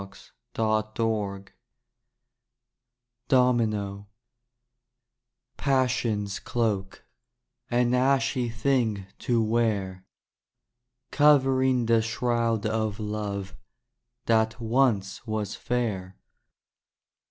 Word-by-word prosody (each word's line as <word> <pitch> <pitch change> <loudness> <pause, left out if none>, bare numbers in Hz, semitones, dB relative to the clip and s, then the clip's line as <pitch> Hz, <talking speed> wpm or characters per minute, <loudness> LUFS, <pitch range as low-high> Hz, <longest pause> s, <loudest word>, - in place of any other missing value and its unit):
DAY 110 -1 +2
DREAMS 105 -4 -2 1.8
DOMINO 110 -6 +1 1.5
Passion's 125 -7 0
cloak, 105 -5 -2 0.6
An 120 0 +2
ashy 130 -1 +2
thing 115 -4 0
to 115 -2 +1
wear, 105 -5 0 1.1
Covering 130 -4 +4
the 115 0 +3
shroud 115 -1 -1
of 110 -1 -1
love 100 -2 -4 0.7
That 110 0 +2
once 115 -3 0
was 110 -2 -2
fair. 100 -7 -3
115 Hz, 65 wpm, -26 LUFS, 105-125 Hz, 1.8 s, Covering